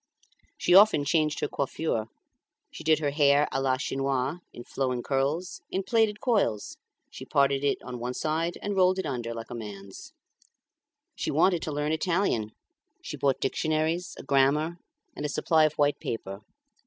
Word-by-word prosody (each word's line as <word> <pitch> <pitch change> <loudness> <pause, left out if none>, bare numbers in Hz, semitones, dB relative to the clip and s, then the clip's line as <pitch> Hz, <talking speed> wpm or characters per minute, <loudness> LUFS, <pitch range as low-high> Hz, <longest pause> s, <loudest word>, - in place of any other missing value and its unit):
She 175 - +2
often 195 -7 +7
changed 155 0 +1
her - - +1
coiffure; 135 -5 -2 0.6
she - - -9
did 155 0 +4
her 145 -2 -1
hair 145 0 +4
a 135 - -1
la 130 -1 +1
Chinoise, 135 +3 -1
in 120 - -10
flowing 125 -1 -2
curls, 145 +7 -1
in 190 - -2
plaited 215 0 +1
coils; 200 - 0 0.3
she - - -9
parted 140 0 +2
in 140 - +2
on 125 -1 -7
one 125 +1 -4
side 165 +2 -1
and 205 -1 -2
rolled 185 0 +4
it 190 - -2
under 120 -5 -3
like 115 0 -7
a - - -4
man's. 100 -4 -9 1.0
She - - -3
wanted 170 +3 +3
to 155 - -4
learn 150 +1 -1
Italian; 160 - 0 0.5
she - - -6
bought 135 -2 +1
dictionaries, 155 +5 -1
a - - -9
grammar, 140 +5 +2 0.4
and - - -6
a 150 - -1
supply 160 +2 +3
of 155 - 0
white 145 -1 +2
paper. 100 -3 -5
145 Hz, 165 wpm, -27 LUFS, 130-165 Hz, 1.0 s, often